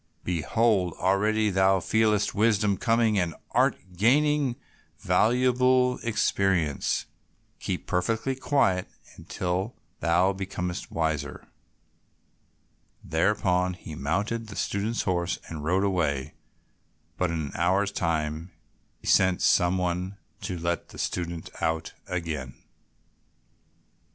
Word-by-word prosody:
Behold, 90 +2 +1
already 105 +3 +2
thou 95 0 +3
feelest 105 +1 +2
wisdom 105 -1 +2
coming, 115 0 +2
and 85 -3 -1 0.2
art - - +3 0.2
gaining 140 - +3 0.4
valuable 125 +2 +3
experience. 95 - +1 0.5
Keep - - -3
perfectly 110 +8 0
quiet 130 -9 +1 0.3
until 95 +5 -3 0.2
thou 90 +3 +3
becomest 90 -2 -4
wiser." 80 -3 -2 1.6
Thereupon 90 +1 +1
he 80 -3 -10
mounted 105 +11 -2
the 100 - -9
student's 105 +4 -1
horse 90 -3 0
and 80 -3 -6
rode 90 +5 +2
away, 80 -9 0 0.8
but 90 - 0
in 85 -1 -2
an 75 -3 -4
hour's 95 +4 +1
time 80 -2 -2 0.5
sent 95 -2 +3
some 90 +1 +4
one 90 +2 -2 0.2
to 90 - -4
let 85 0 -2
the - - -12
student 85 -2 -3
out 80 0 -1
again. 80 -8 -4
95 Hz, 100 wpm, -27 LUFS, 85-110 Hz, 1.6 s, some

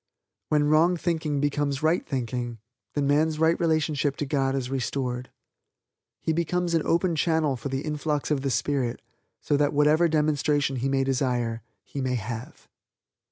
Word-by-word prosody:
When 150 -1 +3
wrong 160 +4 +4
thinking 160 -4 -1
becomes 145 0 -1
right 160 +3 +2
thinking, 125 -3 -3 0.4
then 145 -1 +1
man's 155 +2 +2
right 160 +1 +3
relationship 155 -4 +1
to 145 - -3
God 135 -1 0
is 130 -1 -3
restored. 125 -1 -2 0.9
He 160 - -1
becomes 170 +1 0
an 165 - +3
open 170 0 +2
channel 160 -3 +1
for 125 +3 -5
the 135 0 -2
influx 150 -1 -2
of 145 -3 +1
the 135 - -1
spirit 130 0 0 0.4
so 145 - +1
that 145 0 +2
whatever 150 +3 +4
demonstration 150 -3 +1
he 130 +3 -1
may 135 0 +2
desire 125 -4 0 0.2
he 140 - -6
may 130 -1 0
have. 115 +1 -6
145 Hz, 160 wpm, -26 LUFS, 135-155 Hz, 0.9 s, wrong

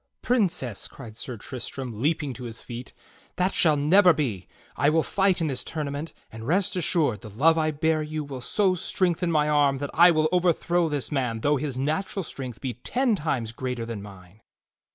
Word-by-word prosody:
"Princess," 180 - 0
cried 115 -5 -11
Sir 120 +1 -6
Tristram 125 0 -6
leaping 150 -1 0
to 125 0 -8
his 115 -1 -6
feet, 120 +1 -8 0.4
"that 185 +2 +1
shall 155 -3 +3
never 180 +5 +6
be! 115 - -2 0.3
I 145 - +3
will 160 +1 +3
fight 195 -2 +2
in 165 - 0
this 135 -4 -2
tournament; 150 0 -4 0.2
and 110 0 -8
rest 185 +5 +1
assured, 155 - +1
the 110 - -9
love 150 +11 +4
I 155 -1 +1
bear 155 +1 +1
you 155 0 -3
will 135 -3 -7
so 190 - +2
strengthen 175 -1 0
my 150 -2 +2
arm 145 -2 +3
that 140 +1 -4
I 175 +2 +7
will 155 -2 +3
overthrow 175 -1 +2
this 145 -6 -2
man 125 -6 -1
though 145 +3 +2
his 135 -2 -3
natural 160 +8 -1
strength 130 -7 -7
be 130 -3 -3
ten 245 - 0
times 135 - -2
greater 125 -1 -4
than 115 -3 -5
mine." 100 0 -13
145 Hz, 190 wpm, -26 LUFS, 125-165 Hz, 0.4 s, I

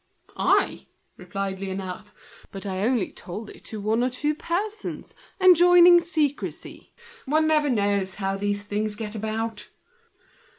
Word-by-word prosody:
"I?" - - +1 0.3
replied 195 -2 -5
Liénard; 190 0 -5 0.4
"but 195 0 -8
I 190 -2 -3
only 230 -1 0
told 210 +5 -8
it - - -15
to 215 - -6
one 220 +4 0
or 250 - +1
two 295 +4 -1
persons, 395 +7 -4 0.3
enjoining 355 -1 +7
secrecy. 310 -5 -2 0.3
One 310 +3 +2
never 305 -2 +2
knows 200 -4 0
how 195 -1 -2
these 205 +1 -2
things 210 +1 -2
get 210 -1 -5
about!" 220 +1 -4
220 Hz, 130 wpm, -25 LUFS, 200-305 Hz, 0.4 s, enjoining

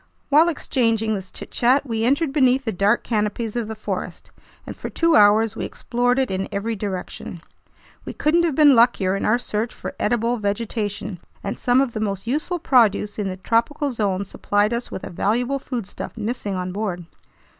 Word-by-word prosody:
While 310 +4 +5
exchanging 230 -8 0
this 190 -2 -5
chitchat, 260 +4 +1
we 225 -3 -1
entered 280 +3 +1
beneath 265 -2 +3
the 225 - 0
dark 200 +4 +2
canopies 215 0 -2
of 235 -3 -2
the 220 - -5
forest, 215 - -5 0.3
and - - -7
for - - -6
two 335 -1 +2
hours 210 +1 +5
we - - -4
explored 245 +1 -1
it 265 -4 +1
in 190 0 -2
every 220 +3 -2
direction. 190 -3 -5 0.6
We - - -6
couldn't 320 +3 +2
have 335 -5 0
been 295 -2 +7
luckier 230 -6 +3
in 195 - -2
our 215 - +3
search 230 -1 -2
for - - -7
edible 235 +2 +1
vegetation, 205 -2 -3 0.2
and 200 - -4
some 245 +1 +3
of 260 -4 -1
the 215 - -3
most 200 -2 -2
useful 305 +8 -1
produce 225 - +2
in 200 -2 -1
the 185 - -5
tropical 235 - 0
zones 200 -4 -1
supplied 205 +3 0
us 235 +1 -3
with - - -7
a - - -6
valuable 245 +9 0
foodstuff 240 -5 -6
missing 215 -2 -3
on 180 0 -3
board. 185 -3 -3
225 Hz, 185 wpm, -22 LUFS, 205-250 Hz, 0.6 s, been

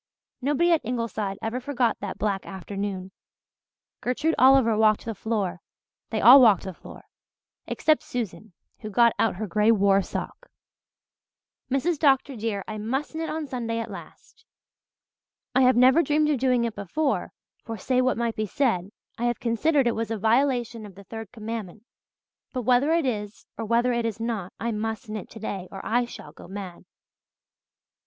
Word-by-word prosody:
Nobody 295 +6 +2
at 325 -3 +3
Ingleside 220 -4 -3
ever 225 +3 -2
forgot 250 -3 0
that 200 -2 -5
black 200 -2 -1
afternoon. 195 0 -5 0.9
Gertrude 300 +6 0
Oliver 260 -3 +6
walked 215 +1 +3
the 225 - -3
floor 200 -4 -2 0.5
they 220 - -1
all 255 +5 +9
walked 215 -7 +5
the 190 - -6
floor; - - -13 0.6
except 310 -1 +2
Susan, 225 - -5 0.3
who 215 - -7
got 235 +2 +4
out 225 - +2
her 215 +4 -4
grey 210 +3 +2
war 200 -3 +4
sock. - - -6 1.2
"Mrs. 285 +4 0
Dr. 275 -2 +3
dear, 215 -3 -3
I 215 -1 -5
must 265 +9 -3
knit 320 0 -3
on 315 0 -3
Sunday 235 -4 -3
at 230 - -4
last. - - -12 1.1
I 260 - +4
have 255 -1 +5
never 260 +6 +6
dreamed 300 -1 +2
of 280 - 0
doing 250 -2 +2
it 230 -2 -2
before 270 - -2 0.3
for, 225 -2 -6
say 255 +5 +1
what 255 -1 +1
might 235 -1 -1
be 215 0 -2
said, 200 -7 0 0.3
I 240 - 0
have 240 -2 0
considered 270 +5 +2
it 235 - +2
was 225 -1 -3
a 225 - -2
violation 235 +1 +1
of 200 -3 -11
the 200 - -12
third 225 +1 -8
commandment. 220 -3 -6 0.7
But 255 -2 -2
whether 255 +5 +3
it 330 -2 +2
is 210 -4 -4
or 225 - -4
whether 235 +3 +2
it 235 -1 -1
is 225 -1 -5
not 225 -5 -3
I 235 - -1
must 220 +2 -4
knit 215 -2 -6
today 200 -4 -6
or 195 - -8
I 240 +2 +1
shall 150 -10 -11
go 160 - -14
mad." 190 -2 -8
230 Hz, 170 wpm, -25 LUFS, 210-255 Hz, 1.2 s, all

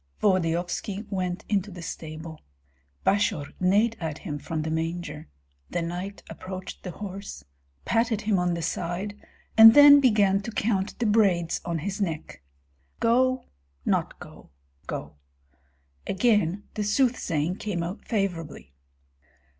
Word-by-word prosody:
Volodyovski 185 +2 0
went 185 -2 -2
into 205 -1 0
the 175 -3 -9
stable. 160 0 -7 0.6
Basior 195 -8 +1
neighed 205 +5 +3
at 160 -3 -4
him 150 -6 -5
from 155 +1 -3
the 160 - -3
manger; 160 -1 -3 0.4
the 175 - -2
knight 180 +4 -5
approached 185 0 -8
the 185 - -6
horse, 195 - -7 0.4
patted 225 -2 +1
him 205 -3 +1
on 180 -1 +1
the 170 - -4
side, 175 +5 -3 0.4
and 225 0 +10
then 290 0 +10
began 205 -7 +3
to 230 - -6
count 205 -2 -1
the 240 - -1
braids 195 -6 +2
on 170 -1 -1
his 195 +6 -4
neck. 165 - -4 0.6
"Go 255 +2 +2 0.4
not - - 0
go - - -13 0.4
go." 75 0 -6 0.9
Again 205 -3 +2
the 210 - -2
soothsaying 205 - +1
came 190 -6 -3
out 180 +5 -6
favorably. 170 - -3
190 Hz, 130 wpm, -26 LUFS, 165-210 Hz, 0.9 s, and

